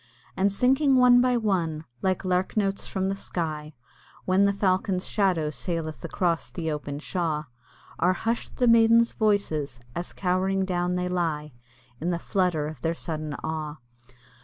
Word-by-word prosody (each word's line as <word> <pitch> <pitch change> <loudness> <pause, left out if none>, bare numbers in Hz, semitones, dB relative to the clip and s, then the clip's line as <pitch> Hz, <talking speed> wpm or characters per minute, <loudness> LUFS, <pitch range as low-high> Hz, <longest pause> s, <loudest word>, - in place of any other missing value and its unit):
And 195 +1 +2
sinking 265 +6 +3
one 250 -1 +7
by 250 -1 +3
one, 170 -8 -1 0.2
like 190 0 0
lark 185 +3 0
notes 195 -2 0
from 190 -1 -1
the 195 - -1
sky 155 -5 -4 0.5
When 190 +2 +4
the 200 - +4
falcon's 190 -1 0
shadow 180 -7 +1
saileth 155 +4 -4
across 170 0 -1
the 160 -3 -3
open 145 -1 -4
shaw, 160 -1 -2 0.6
Are 180 +3 +3
hush'd 230 +4 -3
the 250 - +3
maiden's 230 0 +5
voices, 160 - 0 0.2
as 175 - -4
cowering 190 +1 0
down 180 -1 -1
they 180 0 -1
lie 160 -5 -2 0.5
In 170 - -2
the 175 - 0
flutter 175 -4 0
of 155 - -8
their 165 0 0
sudden 155 -3 -4
awe. 155 -2 -3
180 Hz, 155 wpm, -26 LUFS, 160-200 Hz, 0.6 s, one